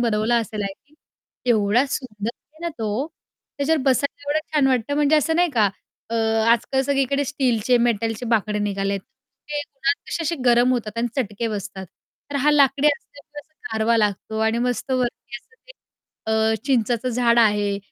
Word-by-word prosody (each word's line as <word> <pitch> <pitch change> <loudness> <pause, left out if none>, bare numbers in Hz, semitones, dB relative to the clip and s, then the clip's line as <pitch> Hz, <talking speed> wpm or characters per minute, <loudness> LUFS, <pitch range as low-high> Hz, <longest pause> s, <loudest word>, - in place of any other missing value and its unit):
बनवलं 230 0 +1
असेल 215 -2 -4
I 195 -1 -3 0.2
think, 305 - -27 0.5
की 245 - +1
एवढा 220 +3 +3
सुंदर 220 -7 -4
आहे 310 +1 -28
ना - - 0
तो, 220 +6 -1 0.5
त्याच्यावर 305 +1 +2
बसायला 280 +2 0
एवढं 310 +1 +2
छान 285 -3 +4
वाटतं 260 +2 0
म्हणजे 295 +1 +4
असं 320 +2 +1
नाही 350 0 +3
का? 220 -7 +3 0.4
अ, - - -2 0.4
आजकाल 250 +3 +2
सगळीकडे 275 +1 +1
स्टीलचे 250 -3 +1
मेटलचे 225 +1 -1
बाकडे 210 0 0
निघाले 200 -1 -1
आहेत. 195 - -2 0.5
ते 295 - -1
उन्हात 320 +5 0
कसे 335 - -2
असे 335 +2 -1
गरम 245 +1 +4
होतात 230 -2 -3
आणि 240 +1 0
चटके 230 -2 -2
बसतात. 200 -2 -5 0.4
तर 285 - -2
हा 285 +2 +3
लाकडी 280 -1 +4
असल्यामुळे 290 +1 -6
असं 310 - -41 0.2
गारवा 220 +1 +2
लागतो 215 0 -1
आणि 220 +1 +1
मस्त 250 +2 -2
वरती 245 -1 -2
असं 455 - -20
ते - - -11 0.5
अ, 220 0 +2
चिंचाचं 245 -1 +1
झाड 235 -1 +2
आहे 205 -2 +3
240 Hz, 175 wpm, -22 LUFS, 220-280 Hz, 0.5 s, छान